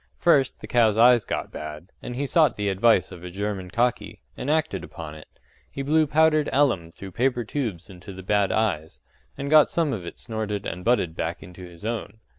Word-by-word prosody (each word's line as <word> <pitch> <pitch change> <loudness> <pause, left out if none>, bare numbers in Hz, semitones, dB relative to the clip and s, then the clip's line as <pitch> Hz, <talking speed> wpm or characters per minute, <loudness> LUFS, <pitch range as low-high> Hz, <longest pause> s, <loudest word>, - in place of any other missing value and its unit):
First, 140 -7 +2
the - - -7
cows' 110 -3 +3
eyes 120 0 +6
got - - -3
bad, 75 +3 -8
and 125 - -6
he 140 +3 -2
sought 155 0 +3
the 105 -1 -1
advice 95 -1 +3
of 85 - -10
a 90 - -6
German 95 0 -4
cocky, 120 +4 -1 0.2
and 135 - -5
acted 155 - 0
upon 80 -3 -8
it; 75 0 -12 0.4
he 140 - -5
blew 155 +2 +3
powdered 155 0 +3
alum 120 - +2
through 95 +3 -10
paper 125 +4 0
tubes 110 - -4
into 95 0 -11
the 95 0 -9
bad 100 +1 +1
eyes, 85 -8 -1 0.4
and 140 - -4
got 155 -1 +7
some 160 -5 0
of 95 - -4
it 85 - -8
snorted 105 -3 -4
and 90 - -5
butted 95 -8 +1
back - - -4
into 90 +1 -12
his 90 +2 -11
own. 115 0 -4
110 Hz, 205 wpm, -24 LUFS, 90-135 Hz, 0.4 s, got